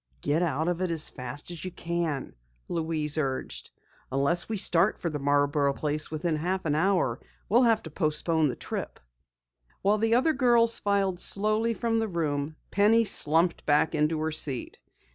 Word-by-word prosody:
"Get 150 +3 0
out 160 -2 -1
of 175 0 -1
it 185 - 0
as 165 -2 -1
fast 135 +5 -5
as 170 -3 -8
you 185 - -3
can," 170 -5 -3 0.3
Louise 160 -2 -2
urged. 135 -3 -3 0.4
"Unless 140 +9 +1
we 220 - -2
start 190 +1 +2
for 170 - -3
the 150 - -4
Marborough 145 0 +1
place 150 0 -2
within 155 +1 -2
half 185 +4 -2
an 150 - +1
hour 160 -7 +1 0.3
we'll 235 +6 +4
have 230 -3 +3
to 160 - -9
postpone 155 0 +1
the 125 - -4
trip." - - -6 0.8
While 205 +2 +2
the 225 +1 +2
other 315 +6 +3
pupils 240 -4 +3
filed 195 -3 0
slowly 215 +4 +1
from 230 -1 0
the 225 - -1
room, 155 -4 -2 0.2
Penny 215 +3 +4
slumped 165 -4 +2
back 150 +2 +3
into 155 +1 +1
her 160 0 -1
seat. 145 -5 0
165 Hz, 170 wpm, -27 LUFS, 150-200 Hz, 0.8 s, we'll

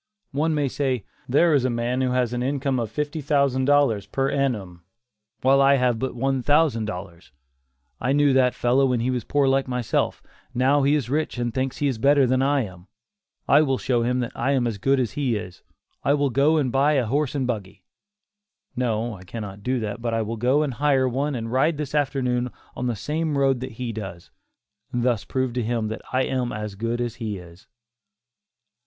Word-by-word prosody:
One 155 +3 0
may 145 -2 +1
say, 130 -4 -1 0.2
"there 155 +5 +4
is 140 -4 +3
a 130 - +1
man 120 +2 -1
who 130 - +1
has 125 -1 0
an 120 - -2
income 135 0 0
of 115 -2 -2
fifty 150 +1 -3
thousand 140 -2 +1
dollars 135 -9 +3
per 135 +5 -1
annum, 105 -11 -2 0.6
while 135 +1 +4
I 140 0 +6
have 125 -3 +1
but 130 0 -3
one 135 +1 0
thousand 145 -5 +2
dollars; 90 -5 -8 0.7
I 125 - 0
knew 145 0 +4
that 130 -1 +3
fellow 130 +3 +3
when 125 -2 +1
he 125 +2 0
was 125 -3 -2
poor 145 +3 +1
like 135 0 +2
myself; 125 -3 -1 0.3
now 135 +4 +3
he 140 +2 +3
is 145 -6 -1
rich 155 -2 -1
and 120 -1 -2
thinks 130 +1 -2
he 145 - 0
is 130 -5 -2
better 140 +2 +4
than 130 +1 +2
I 140 +1 +2
am; 90 -3 -10 0.6
I 145 - +6
will 135 -4 +1
show 120 -2 0
him 125 +2 0
that 120 - -3
I 130 +4 0
am 130 -3 +1
as 110 -4 -2
good 135 +4 +2
as 120 -4 0
he 135 -5 -1
is; 90 -3 -7 0.4
I 140 - +3
will 140 -2 +1
go 145 +5 +3
and 135 -5 +1
buy 140 +4 +3
a 135 -4 +2
horse 140 +4 0
and 135 -2 0
buggy; 100 -5 -5 0.9
no, 120 -2 -1
I 95 -3 -11
cannot 100 0 -7
do 125 +4 -1
that 105 +1 -4
but 115 -1 -1
I 115 - 0
will 110 +2 -4
go 130 +6 +2
and 140 -4 -2
hire 135 0 +2
one 135 +3 -1
and 115 -1 -4
ride 145 +5 +2
this 150 -2 -4
afternoon 125 -4 0 0.3
on 125 - -2
the 120 - -1
same 150 +6 -2
road 135 -2 +2
that 130 0 -6
he 120 +1 -4
does, 95 -6 -8 0.6
and 120 -1 -1
thus 120 -5 +1
prove 130 -2 -1
to 125 - -1
him 115 -1 -1
that 110 - -5
I 130 +1 +2
am 125 -2 -1
as 105 -1 -5
good 115 +4 -2
as 120 -2 -3
he 105 -3 -3
is." 85 0 -14
130 Hz, 215 wpm, -24 LUFS, 115-140 Hz, 0.9 s, I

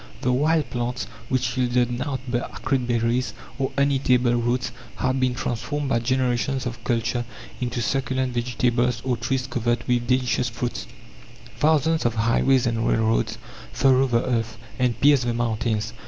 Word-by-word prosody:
The 125 - +1
wild 155 +3 +2
plants, 120 0 -2 0.2
which 125 -2 0
yielded 125 -1 +1
nought 130 +2 -3
but 120 0 -2
acrid 130 -2 -1
berries, 120 +1 0 0.2
or 130 - 0
uneatable 130 -3 +3
roots, 120 +1 0 0.2
have 130 +1 0
been 130 -1 +1
transformed 140 +5 -2
by 120 - +2
generations 130 +2 0
of 120 -1 -5
culture 120 0 0 0.4
into 120 -1 -2
succulent 130 0 -1
vegetables 120 0 0
or 130 -2 +1
trees 130 +2 -1
covered 120 -2 -1
with 120 -1 +1
delicious 125 -1 +1
fruits. 120 +1 -4 0.7
Thousands 160 +1 +3
of 120 - -2
highways 120 +3 +3
and 115 -1 0
railroads 110 0 +1 0.3
furrow 135 0 +3
the 115 -1 +1
earth, 115 -2 -1 0.2
and 125 -2 +1
pierce 140 -1 +5
the 120 -1 -1
mountains. 110 -2 -1
125 Hz, 150 wpm, -24 LUFS, 120-130 Hz, 0.7 s, pierce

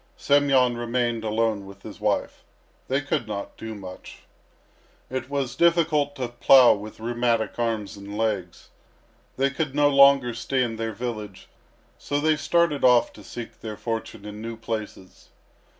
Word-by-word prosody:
Semyon 135 -4 +3
remained 120 -1 -1
alone 110 -2 -1
with 100 0 -14
his - - -10
wife. - - -1 0.4
They 135 +2 0
could 145 -4 -2
not 100 -2 -5
do 110 -1 -7
much. 95 -2 -11 0.9
It 130 0 -4
was 140 -3 -2
difficult 160 -4 +2
to 130 -3 -3
plough 120 +1 +6
with 105 +1 -8
rheumatic 120 0 -1
arms 110 -4 -2
and 100 +1 -8
legs. 100 -6 -3 0.7
They 135 +1 +2
could 140 -1 -3
no 145 0 +4
longer 140 -3 +5
stay 125 +3 -1
in 115 -2 -3
their 115 0 -3
village, 105 -3 -6 0.5
so 145 - -2
they 155 +1 +3
started 155 -1 +1
off 125 -1 +4
to 105 - -14
seek 120 +2 -9
their 110 -2 -6
fortune 110 -1 -5
in 105 0 -8
new 115 0 -6
places. 110 -4 -7
120 Hz, 150 wpm, -25 LUFS, 110-135 Hz, 0.9 s, plough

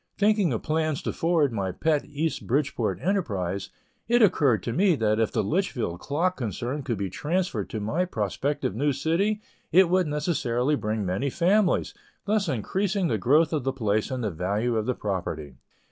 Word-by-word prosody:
Thinking 205 -5 +3
of 115 - -2
plans 155 -2 -1
to - - -2
forward 160 -6 +2
my 95 -4 -1
pet 150 - +1
East 150 +2 -3
Bridgeport 140 +3 0
enterprise, 100 - -1 0.4
it 240 0 +4
occurred 145 - +3
to 115 - -2
me 185 - +3
that 110 -4 +1
if 115 - +1
the - - 0
Litchfield 145 - -1
clock 175 +6 -1
concern 120 +4 -3
could 120 -5 -2
be 100 0 -2
transferred 150 - -2
to 110 - -4
my 130 - 0
prospective 130 - -2
new 145 +4 +1
city, 185 +10 0 0.3
it 185 0 +6
would 185 -2 +3
necessarily 145 -4 0
bring 110 -6 -1
many 95 +10 -1
families, 180 +5 +2 0.3
thus 205 -3 +1
increasing 185 - 0
the 110 - 0
growth 150 - +3
of 150 -4 0
the 135 - 0
place 110 -4 0
and 130 -2 -3
the 105 - -1
value 100 +8 -1
of 110 -1 -1
the 125 - 0
property. 85 -9 -4
140 Hz, 175 wpm, -26 LUFS, 110-170 Hz, 0.4 s, it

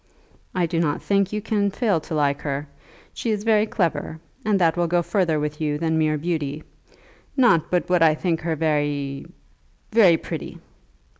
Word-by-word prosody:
"I 180 -2 +2
do 165 0 -1
not 150 -3 0
think 200 -1 +1
you 210 -1 -3
can 205 -2 +1
fail 200 -4 0
to 160 - -5
like 140 -2 +1
her. 145 0 -3 0.5
She 235 - -3
is 210 -2 -1
very 215 -1 +3
clever, 170 -5 -2 0.2
and 210 -2 +2
that 165 -3 +3
will 175 -1 +1
go 175 +1 +1
further 170 -5 +1
with 150 +1 -4
you 150 -1 0
than 160 0 0
mere 155 -1 +1
beauty. 155 -2 -3 0.7
Not 170 - +4
but 180 -1 0
what 180 -1 +2
I 160 -2 +5
think 165 0 -1
her 160 0 -1
very, 145 -3 -1 0.6
very 200 -7 +6
pretty." - - -6
165 Hz, 175 wpm, -23 LUFS, 150-195 Hz, 0.7 s, very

